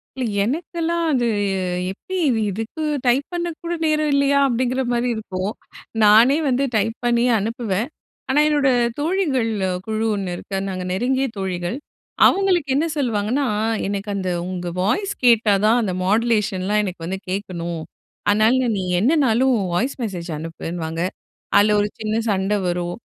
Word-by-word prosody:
இல்லை. 260 - -2 0.2
எனக்கெல்லாம் 335 +5 -1
அது 245 -3 +2 0.6
எப்படி 375 - -7
இது 230 -3 +1
இதுக்கு 225 - -5 0.2
டைப் 260 +4 +3
பண்ண 345 0 -1 0.2
கூட 340 0 -2
நேரம் 305 -1 +1
இல்லையா? 280 0 +3
அப்படிங்கிற 255 +1 0
மாதிரி 240 +1 0
இருக்கும். 195 -2 -3 0.5
நானே 230 +7 +6
வந்து 255 +2 +1
டைப் 220 +2 +1
பண்ணி 235 0 +3
அனுப்புவேன். 225 0 -2 0.4
ஆனா 275 +3 +3
என்னோட 290 -3 +3 0.3
தோழிகள் 295 -9 0 0.4
குழு 220 +1 -1
1 190 -3 -3
இருக்கு. 195 +2 -5
நாங்க 185 -1 -4
நெருங்கிய 260 +6 +1
தோழிகள். 185 +3 -3 0.5
அவங்களுக்கு 370 -6 +2
என்ன 300 +4 +2
சொல்லுவாங்கன்னா, 240 +1 0 0.4
"எனக்கு 200 +1 -3
அந்த 185 -2 -2 0.2
உங்க 180 -1 -4 0.2
வாய்ஸ் 395 - 0
கேட்டா 230 -3 +5
தான். 230 +3 +4
அந்த 190 -4 -1
மாடுலேஷன்லாம் 210 -2 +1
எனக்கு 180 -4 -5
வந்து 190 +2 -3
கேட்கணும். 175 -4 -4 0.5
அதனால 225 +5 +3
நீ - - -1 0.2
என்னனாலும் 265 - +3
உன் 195 -3 -2
வாய்ஸ் 240 +10 0
மெசேஜ் 180 -5 -4
அனுப்புன்னு" 165 +1 -6
வாங்க. 165 +1 -4 0.6
அதில 210 +1 +5
ஒரு 205 - +1
சின்ன 215 0 -2 0.2
சண்டை 195 +1 +1
வரும். 175 0 -2
225 Hz, 145 wpm, -21 LUFS, 195-270 Hz, 0.6 s, நானே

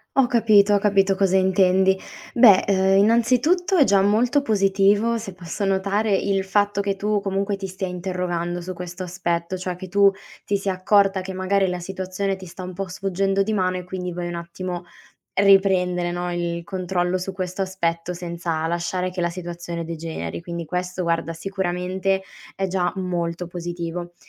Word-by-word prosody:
Ho 270 -2 +5
capito, 215 -4 +4
ho 200 - +4
capito 195 -1 +3
cosa 190 -1 +2
intendi. 190 0 +3 0.4
Beh, 220 -6 +7
uhm, 190 0 +3
innanzitutto 250 - +3
è 290 - +7
già 200 -5 +4
molto 235 +8 +3
positivo, 205 0 +2
se 195 -4 -7
posso 180 +3 -4
notare, 200 +2 +1
il 195 -1 0
fatto 205 +1 +1
che 200 -1 -1
tu 205 +1 0
comunque 195 +1 -1
ti 195 0 -5
stia 190 +1 -4
interrogando 175 -1 -3
su 185 +1 -6
questo 180 +1 -7
aspetto, 175 0 -2
cioè 185 -1 -4
che 185 +1 -8
tu 200 +1 +5 0.3
ti 200 - +1
sia 195 -1 -2
accorta 195 0 +3
che, 190 +1 -6
magari, 190 +1 +1
la 180 0 -2
situazione 190 +1 -3
ti 185 -1 -10
sta 185 +2 -9
un 180 0 -6
po' 195 +1 -4
sfuggendo 195 +1 0
di 215 +2 -2
mano 185 -2 0
e 180 - -5
quindi 180 0 -5
vuoi 175 0 -4
un 175 - -4
attimo 175 +1 -5 0.5
riprendere, 185 -3 +3
no, 175 0 -3
il 170 -1 -2
controllo 185 -1 -1
su 190 +2 -4
questo 185 0 -4
aspetto, 180 -2 -2
senza 170 -2 -3
lasciare 180 +2 -2
che 180 -1 -4
la 170 - +1
situazione 170 -1 -6
degeneri. 160 - -5
Quindi 170 -1 -5
questo, 180 +2 -3
guarda, 165 0 -1
sicuramente 190 +1 -2 0.3
è 195 - -1
già 180 -1 0
molto 175 -2 -2
positivo. 175 0 -5
185 Hz, 175 wpm, -23 LUFS, 175-195 Hz, 0.5 s, Beh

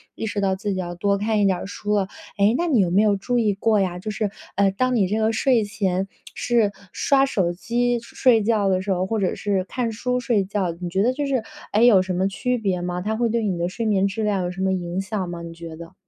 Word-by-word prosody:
意 - - -4
识 205 -1 -2
到 190 -1 +1
自 200 +1 -3
己 185 - -3
要 175 -1 -4
多 200 +2 +1
看 215 0 +1
一 200 - +3
点 185 -2 +2
儿 - - -6
书 210 +1 -3
了。 195 -2 +1 0.3
哎， 205 +4 +4
那 345 - 0
你 260 -9 +3
有 180 -3 +3
没 200 +4 +4
有 205 -2 +3
注 245 +5 -1
意 215 -3 +2
过 210 +1 +2
呀， 180 -2 -1
就 215 - -5
是， 210 -1 -2 0.2
呃， 200 -1 +3
当 255 +5 0
你 195 -5 +3
这 215 +3 -1
个 220 +1 +2
睡 235 -1 +3
前 195 -2 -1 0.3
是 230 -4 +1 0.2
刷 275 -1 +3
手 185 -9 0
机 240 +5 0
睡 235 -1 +3
觉 210 -3 +2
的 185 0 +1
时 195 0 -2
候， 185 0 +1
或 220 +2 -1
者 185 - 0
是 195 -3 0
看 235 +2 -2
书 250 +3 -1
睡 230 -5 +1
觉， 195 -3 -1
你 175 -1 -4
觉 190 +3 +1
得 250 +2 +2
就 290 +1 -2
是 260 -5 0 0.3
哎， 215 - +2
有 210 -6 +7
什 185 0 -3
么 190 +2 +1
区 250 +5 -1
别 190 -5 -1
吗？ 180 0 -3
它 215 +3 -1
会 235 0 +1
对 230 0 0
你 190 -4 -1
的 170 +1 0
睡 230 +4 -4
眠 200 -2 +2
质 215 +3 -3
量 200 -3 0
有 175 - -2
什 190 +1 -6
么 190 0 +2
影 180 +1 -2
响 195 -1 -3
吗 170 -1 -6
你 165 0 -8
觉 165 -1 -9
得？ 165 0 -11
200 Hz, 290 characters per minute, -23 LUFS, 185-225 Hz, 0.3 s, 有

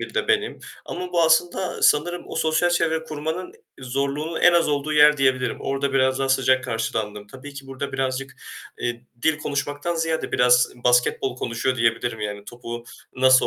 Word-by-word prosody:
biri - - -7
de - - -1
benim 430 0 +1 0.3
ama 180 0 -6
bu 170 - +3
aslında 175 +3 +1
sanırım 175 +4 +2
o - - -8
sosyal 160 +2 +2
çevre 160 -2 +1
kurmanın 160 +4 -5 0.3
zorluğunun 140 +5 -2
en 175 - +6
az 170 -2 +3
olduğu 145 +1 -1
yer 150 0 +6
diyebilirim. 130 -2 +1
Orada 135 0 -2
biraz 130 0 +2
daha 135 0 -1
sıcak 130 -1 +2
karşılandım. 110 -3 -3
Tabii 135 +5 -11
ki 140 -1 -9
burada 135 +1 -6
birazcık, 135 0 -2 0.5
eee, 120 +1 -3 0.2
dil 160 -1 +2
konuşmaktan 145 +3 -3
ziyade 160 -1 -2
biraz 125 0 +4
basketbol 125 +1 +2
konuşuyor 130 +2 -2
diyebilirim. 115 -1 0
Yani 105 -1 -5
topu 120 0 -8 0.3
nasıl. 130 0 +5
135 Hz, 165 wpm, -23 LUFS, 125-160 Hz, 0.5 s, en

